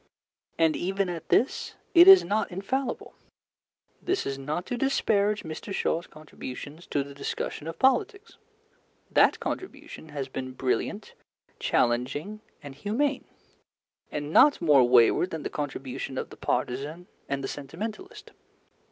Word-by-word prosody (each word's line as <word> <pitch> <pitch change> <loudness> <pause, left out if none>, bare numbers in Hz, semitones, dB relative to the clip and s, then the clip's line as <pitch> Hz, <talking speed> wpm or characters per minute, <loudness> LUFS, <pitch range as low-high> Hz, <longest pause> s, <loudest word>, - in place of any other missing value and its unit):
And, 160 -2 +3
even 195 +1 -1
at 165 -2 -6
this, 255 - +1 0.2
it 345 +1 +8
is 385 -1 +10
not 215 +2 -1
infallible. 225 +9 -3 0.9
This 375 +2 -1
is 135 0 -3
not 150 +6 -3
to 245 - -3
disparage 215 -5 +1
Mr. 160 +5 -7
Shaw's 175 -3 -1
contributions 155 +1 -9
to 145 - 0
the 140 0 -11
discussion 140 +2 -5
of 165 - -6
politics. 325 - +1 0.7
That - - +4
contribution 300 - -6
has 140 -3 -4
been 130 -1 -6
brilliant, 130 0 -2 0.5
challenging, 135 - 0 0.2
and 140 -2 -8
humane, 245 - -1 0.9
and 150 +1 -4
not 290 - +6
more 150 -6 +5
wayward 125 +8 +5
than 160 -4 -5
the - - -4
contribution 135 -2 -5
of - - -4
the - - -10
partisan 140 +8 -3 0.2
and 140 -1 -2
the - - -2
sentimentalist. 210 - -7
165 Hz, 135 wpm, -27 LUFS, 140-215 Hz, 0.9 s, is